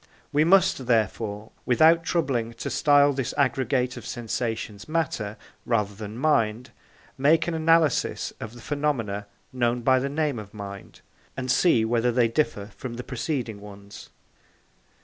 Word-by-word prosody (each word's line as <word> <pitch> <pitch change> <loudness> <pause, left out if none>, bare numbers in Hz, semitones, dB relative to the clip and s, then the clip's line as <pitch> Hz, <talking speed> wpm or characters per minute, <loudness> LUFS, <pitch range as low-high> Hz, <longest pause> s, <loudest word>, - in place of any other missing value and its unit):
We 150 +1 +4
must, 185 -6 +3
therefore, 110 -2 -1
without 160 +7 +4
troubling 130 -10 -1
to - - -5
style 145 -2 +4
this 135 -2 -3
aggregate 130 -1 +1
of - - -9
sensations 115 -2 -4
matter 125 -10 -2 0.3
rather 105 -4 0
than 105 +2 -8
mind, 125 -4 +1 0.5
make 155 +5 +3
an 170 - -1
analysis 160 -3 +2
of 110 +2 -7
the 120 - -12
phenomena 115 -9 -2 0.3
known 120 -1 0
by 130 +2 +4
the 135 +2 -2
name 145 -4 -1
of 105 0 -11
mind, 100 -1 -9 0.4
and 130 -1 -1
see 130 -8 +3
whether 120 +1 +1
they 120 -1 +3
differ 110 -5 -1
from 125 -2 -6
the 125 - -6
preceding 125 -4 -3
ones. 100 -1 -12
125 Hz, 145 wpm, -25 LUFS, 110-145 Hz, 0.5 s, We